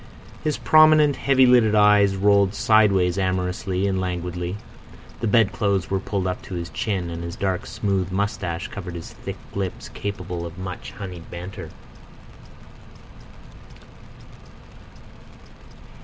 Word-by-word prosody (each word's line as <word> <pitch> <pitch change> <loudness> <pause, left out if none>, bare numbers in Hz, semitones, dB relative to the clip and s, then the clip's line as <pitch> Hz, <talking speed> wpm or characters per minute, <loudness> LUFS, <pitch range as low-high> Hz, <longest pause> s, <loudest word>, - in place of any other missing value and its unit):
His 155 -1 0
prominent, 155 -2 +5
heavy 130 0 +4
lidded 120 -4 +5
eyes 105 -1 +5
rolled 100 0 +3
sideways 100 -4 +3
amorously 95 0 -1
and 95 -1 0
languidly, 90 0 -3 0.6
the 115 - -1
bedclothes 100 -3 +1
were 95 - +1
pulled 95 -1 -3
up 90 -1 -2
to 95 - -8
his 85 -1 -4
chin, 95 -6 -2
and 85 0 -5
his 85 0 -6
dark 95 -2 -2
smooth 95 -3 -1
moustache 95 -3 -2
covered 90 -3 -7
his 85 - -8
thick - - -7 0.2
lips 95 -2 -4
capable 90 -4 -5
of 85 +1 -8
much 95 -1 -7
honeyed 90 -7 -8
banter. 90 +2 -8
95 Hz, 120 wpm, -23 LUFS, 90-105 Hz, 0.6 s, prominent